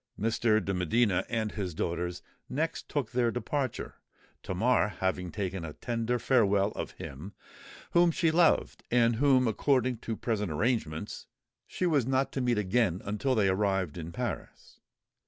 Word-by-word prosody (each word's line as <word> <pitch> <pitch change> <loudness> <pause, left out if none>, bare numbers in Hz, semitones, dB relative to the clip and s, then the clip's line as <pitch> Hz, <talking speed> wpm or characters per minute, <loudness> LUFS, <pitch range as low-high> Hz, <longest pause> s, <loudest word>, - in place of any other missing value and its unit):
Mr. 110 -2 +2
de 100 - -1
Medina 95 +2 +2
and 110 -2 -1
his 95 -6 -4
daughters 85 +2 -3 0.3
next 160 +5 -2
took 135 -7 -2
their 120 -1 +2
departure, 125 +2 -3 0.4
Tamar 105 0 +1
having 90 -2 -1
taken 95 -3 -3
a 80 -2 -6
tender 120 +4 -1
farewell 105 -6 +3
of - - -5
him 75 +9 -8 0.6
whom 175 0 +5
she 165 0 +2
loved, 165 0 +2
and 120 -1 +3
whom, 130 -2 +4
according 125 +1 +1
to 115 -1 -4
present 105 -4 -2
arrangements, 80 -4 -2 0.4
she 185 - -2
was 145 -8 +2
not 135 0 +1
to 135 - -2
meet 120 -2 +1
again 105 -2 +1
until 105 +6 0
they 105 -4 +3
arrived 95 -4 0
in 85 -1 -6
Paris. - - -6
110 Hz, 150 wpm, -29 LUFS, 95-125 Hz, 0.6 s, whom